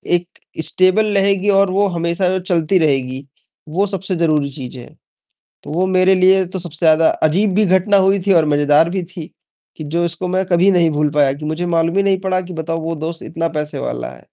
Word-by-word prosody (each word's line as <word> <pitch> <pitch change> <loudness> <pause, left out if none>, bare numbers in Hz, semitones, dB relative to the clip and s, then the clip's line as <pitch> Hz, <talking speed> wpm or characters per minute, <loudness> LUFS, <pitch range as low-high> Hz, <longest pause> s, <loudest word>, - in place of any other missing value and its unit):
एक 175 +1 -5 0.3
स्टेबल 185 +6 +2
रहेगी 195 0 +1
और 195 -1 +3
वो 200 +2 +1
हमेशा 170 +2 -1
जो 185 0 -1
चलती 180 0 0
रहेगी, 135 -3 -1 0.4
वो 185 +6 0
सबसे 190 -1 -3
ज़रूरी 155 -4 0
चीज़ 130 -2 -8
है।" 120 - -11 0.8
तो - - -9
वो 175 +4 0
मेरे 185 0 +3
लिए 190 0 +3
तो 185 +1 -6
सबसे 165 -1 -4
ज़्यादा 160 0 +4 0.2
अजीब 195 +4 0
भी 210 0 +3
घटना 190 +2 +2
हुई 195 +1 +2
थी 195 - +4
और 165 -3 +3
मजेदार 145 +3 +3
भी 185 0 -3
थी, 175 -1 -10 0.5
कि 155 - -7
जो 165 +4 -2
इसको 170 +2 -3
मैं 185 +1 -1
कभी 180 +2 +2
नहीं 175 -3 +3
भूल 150 0 0
पाया 145 -2 +2
कि 150 +2 -9
मुझे 160 +3 -3
मालूम 170 +1 0
ही 200 - +3
नहीं 195 -1 +1
पड़ा 185 -1 -1
कि 180 - -8
बताओ 165 0 -4
वो 165 +1 -4
दोस्त 165 0 -6
इतना 165 +1 -3
पैसे 150 0 -5
वाला - - -5
है। 60 - -16
170 Hz, 220 wpm, -17 LUFS, 155-190 Hz, 0.8 s, ज़्यादा